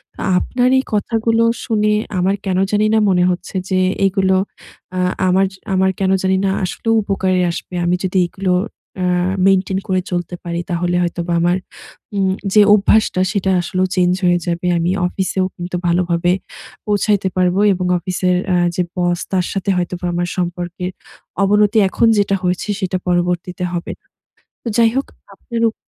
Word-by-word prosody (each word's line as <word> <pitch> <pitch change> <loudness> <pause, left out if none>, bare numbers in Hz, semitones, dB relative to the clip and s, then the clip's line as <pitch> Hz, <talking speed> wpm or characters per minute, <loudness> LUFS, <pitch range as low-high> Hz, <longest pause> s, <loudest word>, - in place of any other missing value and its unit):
তা - - -8 0.2
আপনার 250 +6 +1
এই - - -1
কথাগুলো 225 +2 +1 0.2
শুনে 210 -2 +1 0.3
আমার 190 +2 +2
কেন 185 -2 0
জানিনা 215 +1 +3
মনে 180 -2 +3
হচ্ছে 180 +2 -6
যে, 185 -1 +1 0.3
এগুলো 190 -1 +2 0.6
আ - - 0 0.3
আমার 190 +1 +3
য - - -12 0.2
আমার 190 0 +3
কেন 190 -1 +1
জানি 190 0 +2
না 195 - +2
আসলেও 225 +5 -1
উপকারে 190 -2 0
আসবে। 180 - -7
আমি 175 +1 +2
যদি 190 0 -1
এগুলো 185 +1 -1 0.4
অ্যা 185 - -1 0.4
মেইনটেইন 190 0 +2
করে 185 -2 +1
চলতে 175 0 -3
পারি, 170 -1 -3
তাহলে 175 0 0
হয়তোবা 175 0 -2
আমার 175 +1 +2 0.6
উম 190 -1 +1 0.2
যে 210 - +7
অভ্যাসটা 210 -2 +3
সেটা 195 -3 0
আসলেও 185 +1 -1
চেঞ্জ 180 -1 +3
হয়ে 175 0 +3
যাবে। 175 +1 -2
আমি 170 +1 0 0.2
অফিসেও 190 0 -1
কিন্তু 175 +1 -5
ভালোভাবে 175 0 +1 0.6
পৌঁছাইতে 205 -1 +1
পারবো 180 +1 +2
এবং 180 0 -3
অফিসের 180 +1 0 0.2
আ - - +3 0.2
যে 180 - +1
বস, 175 -1 0
তার 185 -2 +1
সাথে 195 0 -2
হয়তোবা 180 0 -3
আমার 175 0 -1
সম্পর্কের 175 0 -3 0.5
অবনতি 210 +2 +3
এখন 230 - +2
যেটা 200 -1 +2
হয়েছে, 180 +3 -1
সেটা 185 -2 -1
পরবর্তীতে 180 0 -1
হবে 170 -1 -3
না। - - -44 0.6
তো - - -4
যাই 230 -1 +5
হোক 270 - 0 0.3
আপনার 235 -2 -5
উপ 220 - -5
185 Hz, 160 wpm, -18 LUFS, 175-200 Hz, 0.6 s, যে